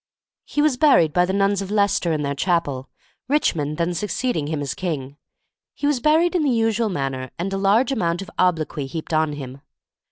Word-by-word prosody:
He 295 - 0
was 300 -5 +2
buried 245 - +4
by 180 +1 +3
the 185 - -2
nuns 200 0 +1
of 195 - -5
Leicester 200 -4 +1
in 155 -2 -1
their 140 0 -1
chapel, 140 -4 -1 0.4
Richmond 155 - 0
then 170 +1 0
succeeding 200 - -2
him 155 -1 -2
as 140 -2 -3
king. 145 -6 -4 0.6
He - - -4
was 290 -3 +2
buried 320 +6 +3
in 355 - +1
the 295 - +2
usual 225 -2 +1
manner, 135 -6 -3
and 195 +3 -3
a - - 0
large 215 +7 +3
amount 175 -7 -1
of - - -12
obloquy 160 -5 0
heaped 160 +3 -6
on 155 -1 +2
him. 135 -1 -8
180 Hz, 195 wpm, -22 LUFS, 150-225 Hz, 0.6 s, buried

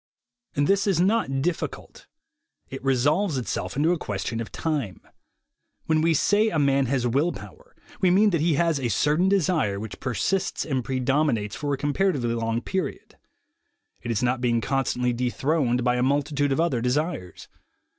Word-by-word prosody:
This 195 +8 +2
is 190 -4 +2
not 180 -9 +1
difficult. 175 0 -4 0.6
It 135 - -7
resolves 145 +6 +1
itself 125 +1 -3
into 155 +4 +3
a 175 - 0
question 105 +3 -3
of 115 - -7
time. 145 - -3 0.9
When 155 -1 +2
we 165 0 +3
say 210 +8 +3
a 165 - -2
man 140 -2 +2
has 125 -1 0
will 140 +8 +1
power, - - -12 0.2
we 185 - +3
mean 205 +4 +4
that 170 -4 +1
he 165 -1 +2
has 165 -1 +1
a 125 -3 -1
certain 150 - +2
desire 160 - +1
which 110 0 -7
persists 175 - -1
and 135 -5 -1
predominates 130 -4 0
for 145 -1 -3
a 140 - 0
comparatively 145 -4 0
long 115 0 -1
period. 190 +5 -4 0.9
It 120 - -6
is 115 +1 0
not 125 0 0
being 120 -2 +2
constantly 125 -1 0
dethroned 125 +1 0
by 125 0 +2
a - - 0
multitude 145 +1 +1
of 135 - 0
other 160 -8 +1
desires. 125 - -2
140 Hz, 165 wpm, -25 LUFS, 125-165 Hz, 0.9 s, mean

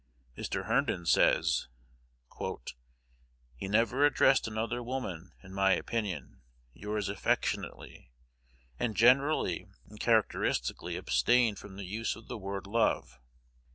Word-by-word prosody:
Mr. - - -3
Herndon 85 -2 0
says, - - +3 1.9
"He 65 - -6
never 115 +7 +2
addressed 135 -3 +4
another 115 +3 -2
woman, 95 -9 -5
in 95 0 -12
my 95 0 +3
opinion, 95 - -3 0.3
'Yours 105 +3 -3
affectionately,' - - -2 0.7
and 110 -4 -1
generally 125 - +3 0.2
and 105 0 -14
characteristically 110 -1 +1
abstained 105 - +2
from 100 -2 -11
the 100 0 -7
use 110 +5 -2
of 115 - -14
the - - -5
word 100 0 -4
'_love. 100 - 0
105 Hz, 110 wpm, -31 LUFS, 95-115 Hz, 1.9 s, addressed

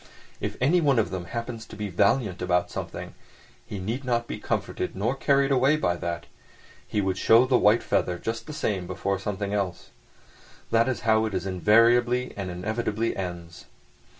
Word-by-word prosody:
If - - -4
anyone 145 -1 +3
of 110 - +1
them 90 -2 -4
happens 115 +2 -5
to - - -11
be 105 0 -4
valiant 100 +1 +1
about 90 -1 +1
something, - - -6 0.5
he 105 - -6
need 110 +8 -3
not 120 -2 0
be - - -6
comforted 90 - -3
nor 105 +6 0
carried 140 0 +2
away 135 +3 +4
by 90 -13 0
that; 85 -1 -4 0.6
he 105 - 0
would 95 -1 -1
show 115 +3 +6
the 130 -1 +3
white 105 +3 +4
feather 90 -1 0
just 115 +4 -4
the - - -6
same 95 -10 -2
before 95 +1 -2
something 100 0 -3
else. 95 -4 -3 0.8
That 115 +2 +3
is 130 - -2
how 110 -1 +3
it 105 -3 -3
invariably 115 +7 +3
and 100 -2 -4
inevitably 110 +5 -2
ends. 85 -3 -6
105 Hz, 170 wpm, -26 LUFS, 95-120 Hz, 0.8 s, show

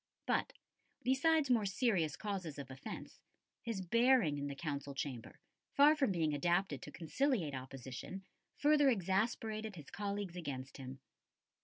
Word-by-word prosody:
But, - - +1 0.5
besides 280 +2 +3
more 220 -4 +3
serious 190 - +1
causes 190 -8 -4
of 135 -2 -7
offence, 130 - -8 0.4
his 225 -5 -3
bearing 230 - +4
in 140 - -2
the 140 - -4
Council 140 -2 -4
chamber, 135 -4 -5 0.4
far 295 +2 +7
from 275 -8 +2
being 160 -4 +1
adapted 175 0 +1
to - - -8
conciliate 180 - 0
opposition, 130 +7 -7 0.3
further 290 -1 +5
exasperated 215 +1 0
his 150 -4 -11
colleagues 200 -3 -3
against 140 -6 -5
him. 135 0 -8
185 Hz, 135 wpm, -36 LUFS, 145-230 Hz, 0.5 s, far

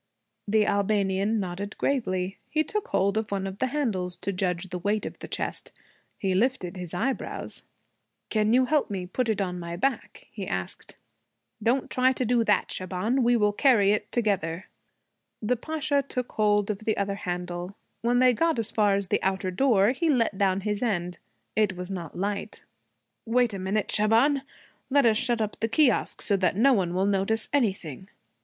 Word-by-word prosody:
The 210 +1 +3
Albanian 200 +1 +1
nodded 195 +2 -5
gravely. 190 -9 -1
He 310 0 +1
took 425 +5 -3
hold 200 +2 +1
of 220 - -5
one 195 -1 -2
of 195 +1 -6
the 260 - +1
handles, 215 -11 -1
to 200 - -4
judge 180 0 -2
the 180 - -3
weight 205 +4 0
of - - -7
the - - -7
chest. - - -3 0.5
He 190 -2 -1
lifted 195 -3 0
his 180 -3 -7
eyebrows. 260 +10 -3 0.7
'Can 215 -1 +2
you 255 +2 +4
help 295 +2 +1
me 190 -3 -3
put 230 +6 -2
it 220 - 0
on 180 -2 -2
my 170 0 -5
back?' 255 +6 -2
he 200 -4 -6
asked. 90 0 -5 0.7
'Don't 245 +5 +1
try 255 +1 +3
to 255 - -2
do 235 0 +2
that, 210 -3 +2
Shaban. 190 +8 -1
We 240 0 +4
will 210 -2 +2
carry 210 -5 +4
it 210 - -1
together.' 190 -7 -1 0.7
The 235 +3 0
Pasha 300 +2 -1
took 250 -3 -5
hold 210 -1 +2
of 200 - -5
the 220 0 -1
other 200 0 0
handle. 180 0 -5 0.3
When 240 +1 +2
they 250 0 +5
got 330 +4 +1
as 225 -1 -1
far 205 -2 +3
as 195 -2 -2
the - - +1
outer 190 0 -1
door 210 -1 +3
he 295 +6 0
let 235 -7 +2
down 190 -1 +1
his 210 0 -2
end. 180 -7 -1 0.4
It 210 -4 +1
was 180 +1 -6
not 170 -5 -6
light. 200 +2 -3 0.6
'Wait 240 -1 +2
a 195 - -4
minute, 195 +3 -1
Shaban. 230 +7 +3 0.5
Let 280 -1 +4
us 220 -2 +4
shut 240 -1 0
up 215 -1 -3
the 225 - -1
kiosque, 250 0 +2
so 200 - +2
that 185 -2 +1
no 265 +5 +5
one 180 -5 0
will 190 +1 +2
notice 200 +3 +1
anything.' 190 - -1
210 Hz, 185 wpm, -26 LUFS, 190-240 Hz, 0.7 s, they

